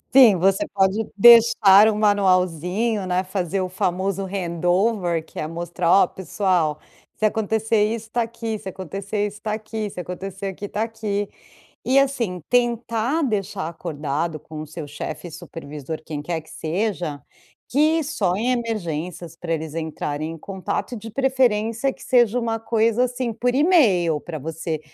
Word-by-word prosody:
Sim, 245 -7 +9
você 195 +2 +2
pode 195 +2 +2
deixar 225 -2 +8
um 215 - 0
manualzinho, 195 +1 +2
né, 180 0 0
fazer 185 0 -2
o 185 - -2
famoso 185 +2 -1
hand 180 -3 -4
over, 180 -3 +2
que - - -10
é 155 - -2
mostrar: 170 +1 -2
"Ó, - - +1
pessoal, 180 -4 0 0.4
se 215 - +1
acontecer 220 0 +1
isso 225 +1 -4
tá 240 - +1
aqui. 230 -1 -4
Se 195 -2 -6
acontecer 195 +3 -3
isso 205 +1 -11
tá 215 - -2
aqui. 215 0 -4
Se 185 - -9
acontecer 190 +2 -5
aqui 195 +1 -6
está 205 +2 -2
aqui". 210 -3 -3 0.6
E 265 +2 +4
assim, 240 -10 -1
tentar 240 +3 +1
deixar 205 - -2
acordado 155 -1 -3
com 155 +1 -9
o 155 - -6
seu 155 0 -8
chefe, 150 +4 -6
supervisor, 160 -3 -7
quem 150 -2 -5
quer 160 +2 -3
que 160 - -18
seja, 170 - -3 0.5
que 310 +4 +3
só 200 - 0
em 225 +6 0
emergências 175 -8 -4
para 170 -1 -4
eles 160 -1 -5
entrarem 155 -1 -3
em 165 - -9
contato 190 +7 -4
e, - - -5
de 225 +2 -9
preferência, 255 -2 +1
que - - -16
seja 245 -1 +3
uma 225 -1 -1
coisa, 225 +1 +2
assim, 245 -1 -2
por 245 +3 0
e-mail, 220 - +4
pra 165 +1 -7
você 160 +1 -4
195 Hz, 160 wpm, -22 LUFS, 170-225 Hz, 0.6 s, Sim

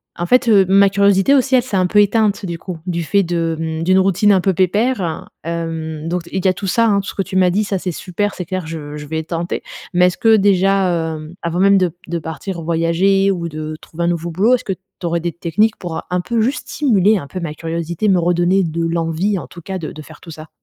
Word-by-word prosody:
a 175 - -4
en - - 0
fait, 245 +3 +3
heu, 200 -3 +6
ma 195 +1 +5
curiosité 200 +4 +3
aussi, 265 -1 +3
elle 250 - +4
s'est 230 -6 -2
un 185 -1 +2
peu 205 +3 +4
éteinte, 205 0 +1
du 170 -2 -4
coup, 180 0 -7
du 170 -1 -1
fait 200 +5 +2
de, 165 -1 -1
mmh, 160 0 -3
d'une 185 +2 +4
routine 195 +2 +3
un 190 - +3
peu 190 +1 +1
pépère, 190 0 0 0.2
hem, 165 -1 -4
donc 175 -1 -2
d 170 - -14
il 190 -1 -1
y 190 - +6
a - - +2
tout 195 +2 -5
ça, 230 +4 +2
hein, 200 -2 +3
tout 195 - -6
ce - - -7
que - - 0
tu 190 0 -3
m'as 185 -1 +4
dit, 205 +4 +1
ça, 200 -1 -2
c'est 180 -1 -3
super. 195 +5 -3
C'est 180 - -4
clair, 185 -1 -4
je 150 -2 -6
je 150 - -8
vais 160 +2 -3
tenter. 170 +1 -4 0.3
Mais 180 0 +5
est-ce 180 - -2
que 225 -1 +5
déjà, 190 -4 +2
hem, 155 +3 -9
avant 170 +1 -2
même 200 +1 +5
de 185 -2 +3
b - - -14 0.2
de 170 0 -2
partir 160 +3 -6
voyager 170 +4 +2
ou 170 -3 -3
de 155 0 -6
trouver 170 +1 -6
un - - +1
nouveau 170 0 -1
boulot, 210 +9 +3
est-ce 250 - -6
que 195 - -1
tu 185 -1 -13
aurais 170 0 0
des 170 +1 -2
techniques 195 +7 0
pour, 175 -3 -6
heu, - - -3
un 180 - 0
peu 230 +4 -1
juste 260 +6 -1
stimuler 215 - +2
un 145 - -6
peu 185 - -6
ma 165 -4 -4
curiosité, 170 +5 -2
me 185 - +4
redonner 175 +2 +2
de 165 +1 -2
l'envie, 165 +4 -1
en - - -9
tout 170 - -12
cas, 190 +3 -5
de 160 -4 -6
de 155 - -9
faire 145 - -14
tout 165 - -11
ça? 155 0 -11
180 Hz, 270 wpm, -18 LUFS, 165-195 Hz, 0.3 s, heu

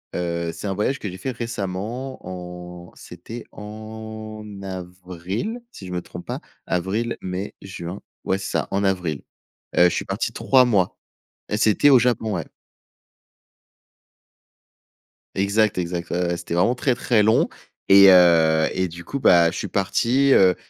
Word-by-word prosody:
Heu, 85 -1 -2
c'est - - -6
un 95 - -1
voyage 120 +7 0
que 105 - -4
j'ai 90 - -8
fait 130 +8 -3
récemment 115 +2 -4
en 90 -1 -8
c'était 110 +7 -9
en 110 0 -8 0.2
avril, 95 - -5
si 95 - -10
je - - -7
me 90 - -2
trompe 90 - -10
pas. - - -4 0.3
Avril, 100 +6 -1
mai, 95 +2 -5
juin, 90 0 -7 0.2
ouais, 95 - 0
c'est 95 - -5
ça, - - -1
en 100 +1 0
avril. 90 -7 -1 0.5
Heu, 90 - +7
je - - +6
suis - - -2
parti - - -2
3 130 -1 +4
mois 100 -7 +1 0.5
et 105 - 0
c'était 110 +6 +4
au 135 - +8
Japon, 120 -3 0
ouais. - - -4 2.9
Exact, 100 +2 +2
exact. 85 -1 -3
Ouais 90 +1 0
ouais, 85 0 -1
c'était 85 0 -6
vraiment 90 +9 +3
très 125 0 +1
très 115 -3 +2
long 110 +2 +4 0.4
et 100 0 +9
heu, 80 -3 +5
et 95 0 0
du 85 +1 -10
coup 140 - -4
bah, 85 -8 +5
je - - -6
suis - - -3
parti, 120 +8 +2
heu, 95 -2 +5
95 Hz, 160 wpm, -23 LUFS, 90-110 Hz, 2.9 s, et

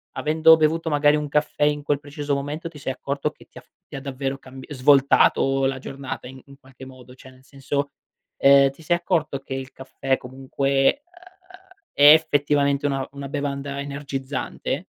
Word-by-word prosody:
avendo 160 +1 +5
bevuto 160 +1 +1
magari 145 0 +3
un 150 0 -2
caffè 150 0 -1
in 150 0 +1
quel 145 -1 0
preciso 145 0 -4
momento, 145 +4 -5
ti 160 - -14
sei 135 -1 -3
accorto 140 +2 -3
che - - -19
ti - - -18
ha - - -9
f - - -32 0.2
ti - - -11
ha 135 - -6
davvero 135 0 -4
cambi 130 0 -13
svoltato 135 -1 +3
la 135 0 -1
giornata 135 -1 -7
in 130 +1 -12
in 140 0 -16
qualche 130 -1 -14
modo, 130 -1 -14
cioè 130 - -15
nel 130 0 -20
senso, 140 +1 -4 0.5
ehm, 140 0 +5
ti 140 - -18
sei 175 +2 +1
accorto 165 -5 -1
che 135 0 -8
il 135 0 -6
caffè 130 0 -3
comunque 135 - -1 0.9
è 145 +1 +8
effettivamente 145 -2 +1
una 135 -1 -2
una 140 0 -8
bevanda 140 -1 -4
energizzante? 140 -1 -5
140 Hz, 175 wpm, -23 LUFS, 135-145 Hz, 0.9 s, è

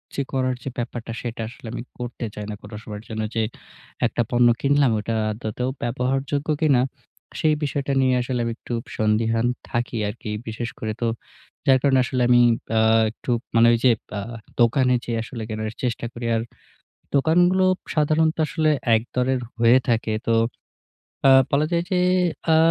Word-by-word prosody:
যে - - 0
করার 130 -1 0
যে - - -3
ব্যাপারটা 120 -1 -4
সেটা 115 -1 -5
আসলে 120 -1 -12
আমি - - -5
করতে 120 -1 -5
চাই 105 - -5
না 105 - -4
কোনো 110 - -10
সময়ের 105 -1 -8
জন্য 110 -1 -3
যে 115 - +2 0.6
একটা - - 0
পণ্য 120 0 +4
কিনলাম, 140 -2 +3
ওটা 115 +2 -2 0.2
আদৌতেও 110 +3 -3
ব্যবহারযোগ্য 135 +4 -1
কিনা 140 -5 +4 0.6
সেই 155 -1 +3
বিষয়টা 140 -1 -1
নিয়ে 130 -1 +3
আসলে 125 0 -2
আমি 115 - -2
একটু 120 - -7 0.2
সন্দিহান 110 +2 +1 0.2
থাকি 120 0 -2
আরকি। 105 +1 -6 0.2
বিশেষ 115 +2 -4
করে 110 -1 -3
তো 120 - +1 0.6
যার 135 - +7
কারণে 135 -2 +4
আসলে 125 0 -1
আমি 120 0 +6 0.4
আ - - +4 0.3
একটু 120 - -5 0.2
মানে 115 +1 +6
ওই - - +3
যে 125 - +7 0.3
আ - - -3 0.4
দোকানে 125 +2 +4
যেয়ে 115 -1 -2
আসলে 115 0 -7
কেনার 110 0 -3
চেষ্টা 120 -1 -1
করি। 120 0 -6
আর 110 - 0 0.7
দোকানগুলো 175 +6 +4 0.3
সাধারণত 155 +1 +2
আসলে 155 0 +1 0.3
একদরের 125 +3 -1 0.2
হয়ে 115 +2 +6
থাকে। 115 -2 +1
তো 115 - +3 0.9
আ - - +8 0.2
বলা 145 +2 +2
যায় 170 0 +1
যে 185 - +2 0.6
আ - - +6
125 Hz, 165 wpm, -23 LUFS, 115-135 Hz, 0.9 s, আ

